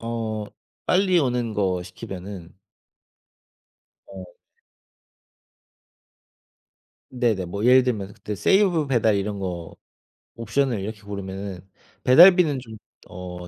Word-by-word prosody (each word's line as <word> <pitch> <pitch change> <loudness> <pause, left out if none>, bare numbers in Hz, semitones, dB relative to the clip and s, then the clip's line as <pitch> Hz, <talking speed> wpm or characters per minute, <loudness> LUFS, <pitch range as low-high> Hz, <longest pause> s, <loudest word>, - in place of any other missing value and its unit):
어 115 -2 -4 0.4
빨리 185 -1 +3
오는 125 -5 -1
거 95 -3 0
시키면은 95 -1 -9 1.5
어. 95 -1 -10 2.8
네네. 115 -7 -1
뭐 100 +5 -5
예를 130 +1 +6
들면 105 -6 -3
그때 105 - -6
세이브 170 - +2
배달 115 -5 +2
이런 100 +1 -3
거 90 -3 -6 0.6
옵션을 125 0 -1
이렇게 105 +1 -6
고르면은 100 -1 -7 0.4
배달비는 165 +1 +6
좀 110 -3 -11 0.3
어 90 -1 -9
110 Hz, 195 characters per minute, -23 LUFS, 95-125 Hz, 2.8 s, 예를